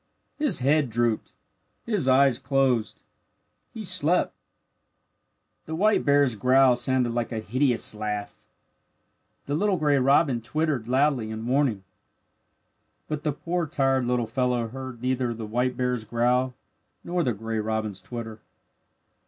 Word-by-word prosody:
His 295 - +1
head 145 +1 +2
drooped. 115 -1 -1 0.5
His 205 - 0
eyes 130 -1 +4
closed. 130 -5 0 0.7
He - - -7
slept. - - +3 1.3
The 160 - -4
white 210 +5 +2
bear's 140 -4 +3
growl 130 +3 +4
sounded 125 -1 0
like 120 -1 -2
a 115 - -3
hideous 120 +3 +1
laugh. 105 -1 -5 1.0
The 140 - -3
little 195 +4 +1
gray 145 -3 +2
robin 135 -1 +3
twittered 140 -1 -2
loudly 130 -3 +1
in 110 +1 -6
warning. 125 -6 +1 1.2
But 150 -1 -3
the 150 - -1
poor 170 +3 -3
tired 135 -4 +1
little 125 -1 0
fellow 120 0 -1
heard 130 -1 -8
neither 125 -2 -1
the 110 0 -6
white 125 +4 -1
bear's 125 -3 -1
growl 125 +3 0 0.5
nor 175 0 -1
the 125 - 0
gray 110 +2 -4
robin's 110 -3 -3
twitter. 115 0 -7
125 Hz, 130 wpm, -25 LUFS, 115-140 Hz, 1.3 s, eyes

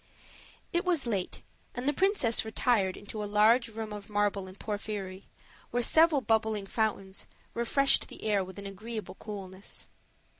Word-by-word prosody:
It 345 +1 +2
was 350 -7 +1
late, 200 -6 -2 0.3
and 245 +3 -3
the 290 - +4
princess 375 - +3
retired 220 -4 +1
into 210 +1 -5
a 205 - -4
large 220 +4 +5
room 220 -1 -6
of 205 +1 -8
marble 205 -2 0
and 185 +1 -12
porphyry, 205 -3 -4 0.4
where 245 0 +1
several 315 +1 +6
bubbling 220 -3 +1
fountains, 195 -2 -2 0.3
refreshed 275 +4 +3
the - - -11
air 205 -3 +2
with 185 +1 -10
an 200 - -7
agreeable 215 +3 -6
coolness. 195 -2 -7
215 Hz, 150 wpm, -30 LUFS, 200-235 Hz, 0.4 s, several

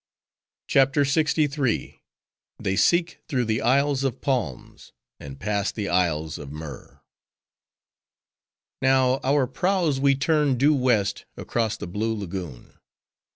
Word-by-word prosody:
CHAPTER 135 +1 +3
LXIII. 145 -3 0 0.6
They 95 - -2
Seek 170 - +2
Through 125 -3 0
The 110 0 -1
Isles 140 +3 +2
Of 135 -4 -2
Palms; 120 - -4 0.3
And 70 -1 -10
Pass 105 0 -1
The 105 -3 -4
Isles 80 -3 0
Of 70 -1 -9
Myrrh 75 -3 -10 1.8
Now, 130 0 +3
our 140 0 +2
prows 170 +1 0
we 140 0 +3
turned 145 -2 +1
due 145 +5 +4
west, 125 -7 +1
across 115 -2 -2
the - - -6
blue 110 +6 -2
lagoon. 90 - -7
125 Hz, 115 wpm, -24 LUFS, 100-140 Hz, 1.8 s, due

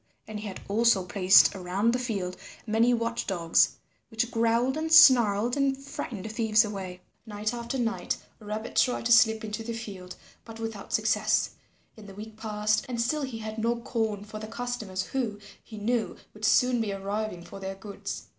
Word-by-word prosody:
And 215 -1 -6
he 210 - -6
had 190 - -7
also 220 -1 +3
placed 190 +1 +5
around 195 +5 0
the 250 - 0
field 200 -7 -3 0.3
many 225 +2 +3
watch 235 -1 -1
dogs 170 -3 +2 0.3
which 235 +1 -2
growled 230 +3 +1
and 320 +1 -3
snarled 240 -8 +6
and 275 -1 +1
frightened 235 -6 -6
thieves 220 -1 +3
away. 190 -3 -6 0.3
Night 210 +1 -3
after 235 +2 -4
night 235 -2 -1 0.2
Rabbit 215 +1 -6
tried 250 -2 +2
to 240 - +1
slip 220 -1 +5
into 215 +1 -4
the 230 +1 -4
field, 195 -5 -8 0.3
but 225 0 -11
without 225 -3 -6
success, - - +1 0.4
and 215 -2 -13
the 195 - -12
week 215 +1 -9
passed 215 -1 0
and 240 -2 -3
still 270 +6 0
he 260 -5 -4
had 220 0 -6
no 230 +2 +1
corn 220 -4 -2
for 215 +1 -8
the 215 - -7
customers 225 -5 -4
who, 235 -6 -3 0.3
he 215 - -11
knew, 225 +2 -1 0.2
would 215 +1 -5
soon 250 +2 +3
be 215 -2 -2
arriving 200 -1 -4
for 195 - -10
their 195 0 -5
goods. 200 +1 -7
220 Hz, 180 wpm, -27 LUFS, 205-235 Hz, 0.4 s, snarled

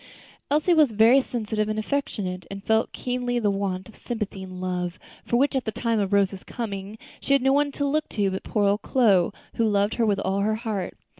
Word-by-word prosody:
Elsie 305 +5 +3
was 305 -8 +4
very 230 +6 +6
sensitive 215 -4 -2
and 215 - -2
affectionate, 210 -7 -3
and 195 0 -7
felt 220 +1 +2
keenly 245 -1 -2
the 210 -4 +2
want 190 -2 -2
of 220 - -15
sympathy 210 -5 -5
and 185 -1 -8
love, 180 -1 -3 0.3
for 240 - +2
which, 280 +2 +2
at 265 - +1
the 220 - -3
time 230 0 0
of 200 -1 -1
Rose's 195 -1 +1
coming, 205 -2 -5 0.2
she 275 - 0
had 275 -2 +3
no 270 0 +4
one 285 0 +2
to 285 +1 -2
look 305 +2 0
to 200 -3 0
but 190 - -3
poor 210 -2 0
old 200 +2 +2
Chloe, 205 -9 +3 0.3
who 230 - +2
loved 205 -1 +2
her 235 - +1
with 205 -2 +2
all 195 0 0
her 215 +2 +1
heart. 215 -5 -4
215 Hz, 220 wpm, -25 LUFS, 195-245 Hz, 0.3 s, very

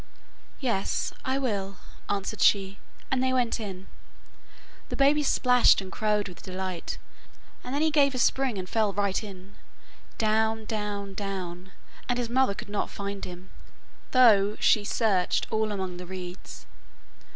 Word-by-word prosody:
'Yes, 230 -8 -1
I 260 +1 0
will,' 200 -7 -2 0.3
answered 200 +1 -2
she, 195 -1 +3 0.3
and 260 -1 +2
they 260 0 +2
went 245 -3 +1
in. 190 -3 -6 1.0
The - - -3
baby 285 +2 +4
splashed 250 -3 +5
and 190 -1 -7
crowed 210 -1 0
with 180 - -11
delight, 185 -2 -4 0.7
and 250 - -6
then 295 - +1
he 315 - +3
gave 280 -3 +3
a - - -1
spring 255 -2 +2
and 185 -1 -4
fell 215 -1 +1
right 200 +1 0
in, 195 -1 -10 0.6
down, 220 0 +1
down, 205 -2 -3
down, 190 -2 -5 0.4
and 245 - +1
his 240 -2 -2
mother 260 -5 +3
could - - -8
not 205 0 -2
find 200 0 -5
him, 180 +1 -10 0.6
though 210 -5 +5
she 210 - +4
searched 205 -4 +1
all 220 -1 +1
among 190 -3 -3
the 180 0 -8
reeds. 180 0 -8
205 Hz, 150 wpm, -27 LUFS, 190-240 Hz, 1.0 s, splashed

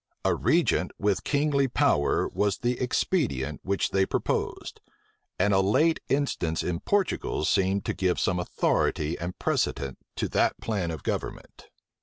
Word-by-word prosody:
A - - +4
regent - - +2
with 100 -1 0
kingly 140 -1 +2
power 75 - +2
was 105 -2 0
the 120 0 -1
expedient 110 - 0
which 100 0 -1
they 95 0 +3
proposed; - - -2 0.6
and 100 +2 +2
a 95 - +4
late 150 +13 +3
instance 135 - 0
in 85 -1 -2
Portugal 195 - 0
seemed 95 +2 +1
to - - -1
give 90 -2 0
some 90 -1 +1
authority 80 -2 0
and 90 +2 -5
precedent 70 -2 -1 0.2
to - - -1
that - - +1
plan 100 -6 -2
of 80 -2 -6
government. - - -5
95 Hz, 145 wpm, -27 LUFS, 85-125 Hz, 0.6 s, A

